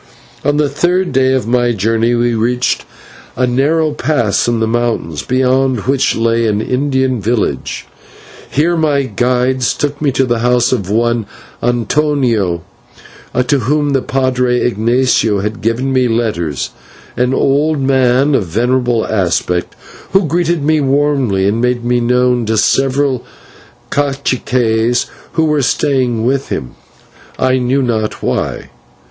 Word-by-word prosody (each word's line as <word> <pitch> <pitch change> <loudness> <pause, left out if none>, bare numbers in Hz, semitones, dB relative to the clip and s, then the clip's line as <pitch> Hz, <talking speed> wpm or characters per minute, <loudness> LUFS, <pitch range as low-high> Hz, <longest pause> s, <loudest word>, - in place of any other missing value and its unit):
On 145 +1 +1
the 150 -1 +2
third 175 +6 0
day 130 0 +2
of 130 -4 0
my 120 +1 +1
journey 115 +3 +1
we 120 0 +1
reached 120 +3 0 0.5
a 130 - +1
narrow 150 +6 +1
pass 125 -10 0
in 120 -1 0
the 110 - +1
mountains, 115 -9 -1
beyond 130 -1 +1
which 135 +4 +1
lay 115 0 +1
an 105 -1 0
Indian 130 0 0
village. 115 +2 -2 0.6
Here 165 +5 +1
my 150 -4 +1
guides 125 -2 0
took 145 0 -3
me 145 -2 +2
to 135 +1 +2
the 120 -2 0
house 125 +1 +2
of 100 -8 -1
one 115 0 0 0.3
Antonio, 120 - 0 0.8
to 145 -2 +2
whom 145 +4 0
the 135 -1 +1
/padre/ 125 -2 0
Ignatio 115 -2 +1
had 105 +3 -4
given 120 +5 -1
me 130 -1 +2
letters, 105 - -2 0.4
an 125 +2 +1
old 150 +2 +1
man 135 +1 +2
of 105 -9 +1
venerable 120 +4 0
aspect, 90 -3 -1 0.4
who 195 -1 +3
greeted 170 0 0
me 155 +1 +2
warmly, 135 -8 +1
and 110 +3 0
made 125 -1 0
me 120 0 +2
known 125 -1 +1
to 110 0 0
several 135 +3 +1 0.7
/caciques/ 125 -4 0 0.3
who 160 - +2
were 150 -2 +1
staying 125 -4 0
with 135 +2 0
him, 65 - -4 0.7
I 130 0 +2
knew 130 +2 +1
not 110 -3 -2
why. - - -2
125 Hz, 140 wpm, -14 LUFS, 115-135 Hz, 0.8 s, who